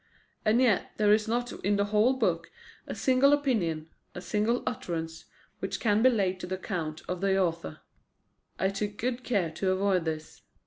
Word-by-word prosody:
And 220 +3 +3
yet 240 -7 +2
there 210 -1 +5
is 215 +1 +2
not 240 +2 -1
in 205 +2 +2
the 200 0 +1
whole 215 +5 +3
book - - 0 0.4
a - - -5
single 265 +2 +4
opinion, 195 - 0 0.3
a - - -4
single 215 +5 0
utterance, 165 -10 -4 0.3
which - - -3
can 210 -1 +2
be 255 - +7
laid 190 -6 0
to 180 - -6
the 185 - -2
account 165 -5 -4
of 180 +1 -3
the 195 -1 +2
author. 170 -3 -2 0.8
I 190 - +1
took 205 +1 -4
good 250 +1 -2
care 195 -10 0
to 190 +4 -1
avoid 185 -2 +1
this. 160 -1 -5
200 Hz, 180 wpm, -28 LUFS, 180-235 Hz, 0.8 s, be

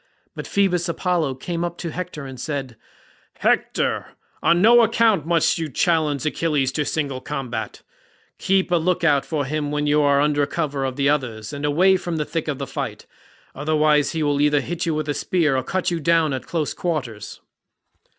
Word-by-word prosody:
But - - -7
Phoebus 180 -3 +1
Apollo 170 -5 0
came 170 +5 -4
up 175 0 -4
to 170 - -5
Hector 170 -4 -6
and 130 -2 -9
said, 135 -3 -4 0.6
"Hector, - - 0 0.3
on 170 - +3
no 235 +5 +7
account 225 -7 +2
must 170 0 +2
you 160 -2 -3
challenge 155 -2 +1
Achilles 150 -4 0
to 150 +1 -1
single 140 -5 -2
combat; 130 -6 -5 0.6
keep 190 -1 +1
a 175 - +4
look 170 +1 0
out 145 -4 +3
for 150 -4 -1
him 150 +1 -2
while 150 0 -1
you 150 +1 +3
are 140 -1 +3
under 145 0 +2
cover 145 -5 -2
of 130 -1 -3
the 140 0 +1
others 125 -6 -1
and 145 +1 -4
away 185 +6 +4
from 175 -2 -4
the 150 - -1
thick 165 0 -3
of 145 -3 -2
the 140 - -4
fight, - - -5 0.5
otherwise 150 +1 +2
he 160 -1 -1
will 145 -1 +1
either 145 -1 +3
hit 175 0 -4
you 160 - 0
with 155 -1 -2
a 145 - 0
spear 155 -3 +1
or 130 - +1
cut 185 +8 -2
you 170 - -1
down 165 -1 +2
at 130 - -5
close 160 -4 -2
quarters." 125 - -4
150 Hz, 190 wpm, -22 LUFS, 140-170 Hz, 0.6 s, no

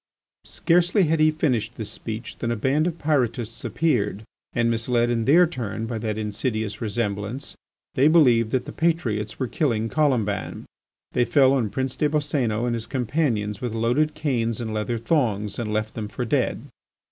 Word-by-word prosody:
Scarcely 180 +3 +2
had 160 -1 +1
he 155 0 +5
finished 125 -7 0
this 110 -3 -6
speech 115 +1 -7
than 115 - -2
a 120 - 0
band 140 +8 +1
of 170 -2 -3
Pyrotists 125 -7 -1
appeared, 110 - 0 0.3
and 115 -1 +1
misled 120 +1 +1
in 115 -2 0
their 170 +6 +6
turn 115 -8 -4
by 115 -1 -4
that 110 -1 -3
insidious 110 0 -3
resemblance, 105 +3 -3 0.4
they 135 +3 +4
believed 125 -9 +5
that 130 +2 -1
the - - -7
patriots 115 -11 -1
were 130 - -1
killing 115 -3 0
Colomban. 125 -10 0 0.5
They 125 - +2
fell 130 +3 +4
on 120 -6 +1
Prince 130 +3 -3
des 150 - +2
Boscénos 140 -7 0
and 120 - 0
his 115 -1 -4
companions 125 -5 -1
with 120 -3 -3
loaded 125 +7 +1
canes 115 -7 -1
and 110 -2 -4
leather 110 +2 -1
thongs, 115 -6 0
and 110 -3 -3
left 110 0 -1
them 110 -2 -4
for 120 +4 -4
dead. 110 - 0
120 Hz, 170 wpm, -24 LUFS, 110-145 Hz, 0.5 s, their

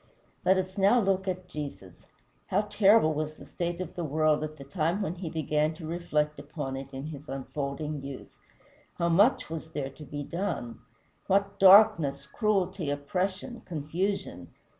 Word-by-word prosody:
Let 190 +1 +4
us 185 +1 -3
now 200 +6 +5
look 195 -2 +1
at 185 -1 -3
Jesus. 145 - -8 0.4
How 195 - +2
terrible 205 -5 +4
was 155 0 -3
the - - -13
state 175 0 -3
of 185 -3 -5
the 175 - -4
world 155 0 +2
at 155 0 -6
the 140 - -9
time 165 +7 -1
when 175 - -2
he 180 -2 -6
began 155 0 0
to 160 -1 -9
reflect 155 -2 -1
upon 145 -2 -5
it 135 0 -6
in 135 +1 -6
his 150 -1 -8
unfolding 140 +2 -4
youth! 140 -1 -8 0.6
How 170 0 0
much 220 +9 +4
was 160 0 -7
there 135 -2 -3
to 145 +3 -12
be 145 -1 -5
done! 170 -8 -4 0.5
What 200 +1 +1
darkness, 170 -8 +6
cruelty, 190 -1 0
oppression, 185 - -2
confusion! 160 - -3
160 Hz, 160 wpm, -29 LUFS, 145-190 Hz, 0.6 s, darkness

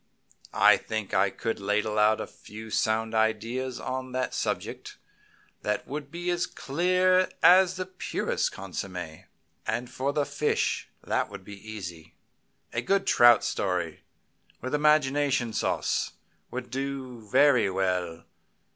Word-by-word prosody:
I - - +7
think 110 -3 -5
I 95 +1 +4
could 115 +3 -3
ladle 105 +2 0
out 105 +1 +4
a - - -3
few 110 +1 -11
sound 110 +1 +1
ideas 115 +4 0
on 130 0 -4
that 130 -1 -1
subject - - -3 0.6
that 105 0 -2
would 145 0 -5
be 175 +3 -3
as 175 0 0
clear 185 +5 +2
as 185 0 +7
the 185 0 -3
purest 185 0 -2
consommé. 90 -4 -6 0.4
Then 115 +3 -1
for 130 +3 -2
fish, 145 +2 -1
that - - 0
would 95 - -9
be 100 +2 -11
easy. 85 -6 -8 0.6
A 120 - 0
good 195 +9 +1
trout 120 -2 +6
story, 90 -4 -2 0.6
with 130 +3 -5
imagination 145 -5 +2
sauce, - - 0 0.4
would 125 -1 -6
do 135 -2 -4
very 135 -4 +5
well. 90 -3 -1
120 Hz, 130 wpm, -27 LUFS, 105-140 Hz, 0.6 s, I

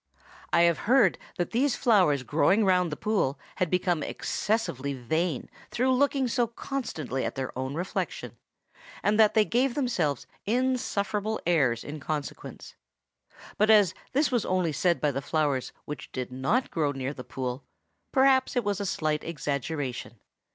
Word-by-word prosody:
I 170 - +4
have 170 -2 +4
heard 240 -8 +5 0.2
that 175 - -2
these 255 +3 +2
flowers 180 - +3
growing 190 +10 +3
round 180 -3 +3
the - - -2
pool 200 -11 0 0.2
had 185 -3 +1
become 180 -2 +1
excessively 145 - -2
vain 155 +4 -1 0.2
through 260 +2 +1
looking 275 0 +2
so 240 0 +1
constantly 220 - -4
at - - -3
their 130 -1 -4
own 130 +2 -3
reflection, 175 +3 -4 0.7
and 210 +1 +2
that 215 -1 +5
they 215 -1 +5
gave 245 +3 +1
themselves 185 - 0 0.2
insufferable 220 -3 0
airs 140 -9 +2
in 150 +1 -7
consequence; 145 0 -6 0.9
but 215 +1 +4
as 205 -5 +6 0.2
this 285 +2 +2
was 245 -3 +1
only 180 -3 0
said 170 +3 +1
by 150 - +1
the 135 0 -3
flowers 145 -3 0
which 145 -2 -7
did 125 -1 -4
not 135 - 0
grow 150 -4 0
near 135 0 -4
the 125 - -8
pool, 130 0 -4 0.5
perhaps 265 0 +4
it 245 - +1
was 205 -1 -1
a 200 - -2
slight 155 -3 -1
exaggeration. 140 -5 -4
175 Hz, 155 wpm, -27 LUFS, 140-225 Hz, 0.9 s, as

